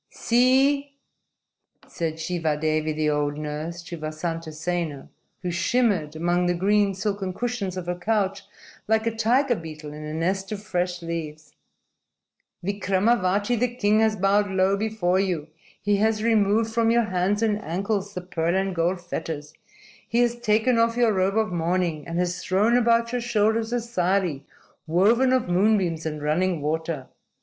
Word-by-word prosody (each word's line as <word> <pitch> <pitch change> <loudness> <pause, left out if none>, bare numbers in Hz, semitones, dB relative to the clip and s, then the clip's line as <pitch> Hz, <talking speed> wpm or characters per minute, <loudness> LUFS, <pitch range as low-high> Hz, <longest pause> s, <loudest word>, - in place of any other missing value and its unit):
_ - - -57
"See!" 270 +4 +2 0.9
said 165 -2 -3
Shivadevi, 155 -2 -1
the 155 0 0
old 145 0 -1
nurse, 155 +3 -5
to 170 0 -8
Vasantasena, 155 0 -4 0.3
who 180 - -1
shimmered 175 -4 +1
among 175 +2 +1
the 175 - +1
green, 200 +2 +2
silken 195 -1 -2
cushions 225 -6 -3
of 180 - -4
her 175 - -1
couch 195 +1 -1 0.4
like 220 +1 +2
a 230 -1 -1
tiger 245 +4 +2
beetle 155 -4 -8
in 150 0 -8
a 150 - -5
nest 190 +4 -1
of 205 -1 -5
fresh 180 -2 -2
leaves. 155 -2 -6 1.1
"Vikramavati, 200 +2 +1
the 245 0 0
king, 210 -2 +2
has 220 -1 +3
bowed 200 +1 +2
low 190 +1 +2
before 200 -3 0
you. 175 -6 -1 0.3
He 205 0 +1
has 215 +1 +1
removed 220 0 +2
from 230 0 +2
your 235 +1 +4
hands 190 +3 0
and 210 -1 +1
ankles 200 +3 -2
the 180 - -3
pearl 170 -1 -1
and 190 0 0
gold 175 +2 0
fetters. 160 -3 -5 0.6
He 235 +1 +2
has 240 -1 +2
taken 230 +2 +2
off 230 +1 +2
your 235 -3 +3
robe 190 +2 +1
of 220 -4 +1
mourning 170 -2 -1
and 165 0 -3
has 175 0 -1
thrown 210 +6 +2
about 235 -1 +3
your 245 0 -1
shoulders 225 -1 +1
a 245 - +1
sari 185 - -1 0.4
woven 220 +10 +3
of 255 -5 +2
moonbeams 180 -3 +1
and 150 -1 -5
running 170 +3 +1
water. 155 -1 -2
190 Hz, 160 wpm, -24 LUFS, 165-220 Hz, 1.1 s, your